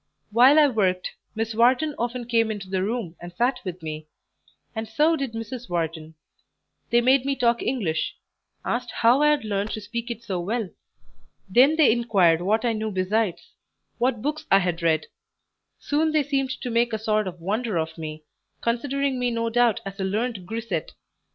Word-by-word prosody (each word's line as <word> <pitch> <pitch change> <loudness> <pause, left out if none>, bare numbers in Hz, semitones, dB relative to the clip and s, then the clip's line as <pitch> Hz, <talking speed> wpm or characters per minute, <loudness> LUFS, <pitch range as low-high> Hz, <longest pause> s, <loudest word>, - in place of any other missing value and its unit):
While 250 +7 +6
I 300 -1 +7
worked, 190 -7 0 0.2
Miss 225 0 -2
Wharton 255 +7 +3
often 240 +1 -2
came 230 -1 +2
into 205 -3 -5
the 190 0 -1
room 205 -4 -3
and 175 0 -8
sat 245 +8 0
with 180 -2 -6
me, 155 -1 -6 0.7
and 220 0 -3
so 300 +9 +3
did 275 -6 -3
Mrs. 235 +2 -6
Wharton; 160 -2 -3 0.7
they 240 0 +4
made 260 +2 +4
me 275 0 0
talk 235 -2 +2
English; 185 -12 -1 0.5
asked 245 +1 -2
how 240 +5 +3
I 300 - +5
had 295 -6 +1
learned 205 0 -1
to - - -3
speak 235 +3 -5
it 235 -1 -5
so 185 -5 -3
well; 205 +2 -2 0.8
then 255 +10 +5
they 310 -6 +5
inquired 200 -8 +3
what 215 +6 +1
I 235 - +2
knew 220 0 -2
besides 195 0 -1 0.5
what 240 -2 0
books 305 +2 -3
I 195 - +7
had 180 -3 -1
read; 160 -2 +2 0.7
soon 310 +2 0
they 305 -1 +3
seemed 270 -1 -1
to 250 - -3
make 235 0 +2
a - - +1
sort 215 -1 0
of 180 -1 -7
wonder 210 +3 -1
of 160 0 -2
me, 155 -1 -7 0.4
considering 265 +3 -1
me 245 0 +1
no 230 -1 -1
doubt 240 -2 +3
as 195 +1 -7
a - - -1
learned 205 -1 -2
grisette. 230 +1 -4
225 Hz, 185 wpm, -24 LUFS, 190-250 Hz, 0.8 s, I